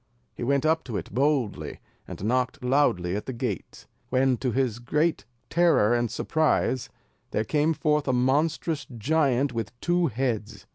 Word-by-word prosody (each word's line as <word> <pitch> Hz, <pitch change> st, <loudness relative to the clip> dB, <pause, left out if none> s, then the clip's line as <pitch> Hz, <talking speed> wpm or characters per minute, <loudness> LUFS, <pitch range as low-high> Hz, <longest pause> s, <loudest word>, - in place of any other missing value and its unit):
He -, -, -6 dB
went 140 Hz, +3 st, +1 dB
up 160 Hz, +1 st, +2 dB
to 115 Hz, -5 st, -3 dB
it 95 Hz, -, -7 dB
boldly, 135 Hz, -3 st, 0 dB, 0.3 s
and -, -, -8 dB
knocked 125 Hz, +3 st, 0 dB
loudly 125 Hz, -10 st, +2 dB
at 105 Hz, -, -4 dB
the 130 Hz, -, -3 dB
gate, 115 Hz, -, -5 dB, 0.2 s
when, 130 Hz, 0 st, +3 dB
to 130 Hz, 0 st, -1 dB
his 120 Hz, -2 st, 0 dB
great 150 Hz, +7 st, 0 dB, 0.2 s
terror 165 Hz, -10 st, +3 dB
and 120 Hz, -1 st, +1 dB
surprise, 150 Hz, -2 st, 0 dB, 0.4 s
there 105 Hz, -, 0 dB
came 150 Hz, +4 st, +2 dB
forth 150 Hz, -1 st, +1 dB
a -, -, +3 dB
monstrous 145 Hz, +4 st, +1 dB
giant 135 Hz, +1 st, +1 dB
with 115 Hz, +1 st, -5 dB
two 175 Hz, 0 st, +2 dB
heads. 115 Hz, -, -3 dB
130 Hz, 155 wpm, -26 LUFS, 115-150 Hz, 0.4 s, when